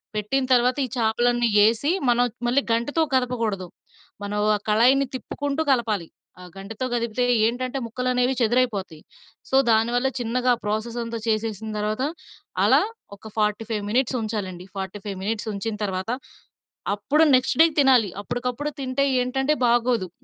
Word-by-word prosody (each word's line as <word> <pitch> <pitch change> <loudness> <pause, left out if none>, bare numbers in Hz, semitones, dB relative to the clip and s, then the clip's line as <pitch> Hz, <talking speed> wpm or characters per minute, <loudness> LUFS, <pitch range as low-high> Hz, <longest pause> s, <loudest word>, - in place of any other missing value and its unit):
పెట్టిన 235 +6 0
తర్వాత 250 +1 +4
ఈ - - -6
చేపలన్నీ 240 +1 +2
యేసి, 225 +7 +3 0.2
మనం 240 +1 +4 0.2
మళ్ళీ 250 +4 +3
గంటెతో 235 +8 0
కదపకూడదు. 230 -7 0 0.6
మనం 205 +1 -3 0.2
ఆ - - 0
కళాయిని 250 +6 +4
తిప్పుకుంటూ 285 +3 -3
కలపాలి. 220 -9 0 0.3
ఆ - - -10
గంటెతో 205 +5 -6
కదిపితే 235 0 -1 0.2
ఏంటంటే 255 +3 -1
ముక్కలనేవి 250 +2 0
చెదురైపోతాయి. 220 -8 0 0.5
సో, - - 0
దానివల్ల 235 +3 +2
చిన్నగా 250 +2 +1
ప్రాసెసంతా 230 +2 -3
చేసేసిన 220 -1 -1
తర్వాత 215 +4 -1 0.6
అలా - - +5 0.4
ఒక 220 +2 -12
45 210 0 -1
మినిట్స్ 255 +3 +1
ఉంచాలండి. 195 -5 -4
45 195 +1 -5
మినిట్స్ 220 +2 -2
ఉంచిన 210 +2 -3
తర్వాత, 190 0 -3 0.9
అప్పుడు 285 +10 +2
నెక్స్ట్ 255 +1 +1
డేకి 325 -1 +4
తినాలి. 255 -7 +5
అప్పటికప్పుడు 250 +7 -3
తింటే 270 +1 0 0.2
ఏంటంటే 265 +4 0
బాగోదు. 235 -5 +2
235 Hz, 125 wpm, -24 LUFS, 210-255 Hz, 0.9 s, అలా